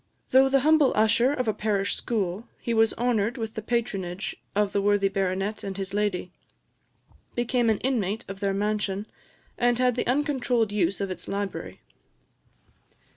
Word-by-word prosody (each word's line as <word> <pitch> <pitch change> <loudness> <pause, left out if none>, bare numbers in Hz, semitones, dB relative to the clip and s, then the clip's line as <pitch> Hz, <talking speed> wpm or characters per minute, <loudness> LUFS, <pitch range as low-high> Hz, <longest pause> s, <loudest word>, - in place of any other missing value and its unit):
Though 265 +1 +6
the 270 0 +3
humble 305 -1 +4
usher 220 +4 +4
of 255 -4 -1
a 215 - +2
parish 205 -1 0
school, 210 -1 -2
he 235 - -2
was 225 -1 +3
honoured 235 0 0
with 225 -2 -4
the 220 - -4
patronage 200 -6 -2 0.2
of 205 -1 +1
the 200 - +2
worthy 205 -1 +3
baronet 195 +1 -1
and 195 -1 -5
his 195 0 -5
lady, 205 -3 -1 1.0
became 240 -1 +1
an 220 - +3
inmate 225 -4 -1
of 195 0 -7
their 200 -1 0
mansion, 205 0 -1 0.5
and 240 0 +3
had 250 0 +3
the 245 - -2
uncontrolled 250 -5 +1
use 200 -1 0
of 195 -1 -2
its 185 - -6
library. 200 0 -4
215 Hz, 160 wpm, -26 LUFS, 195-245 Hz, 1.0 s, Though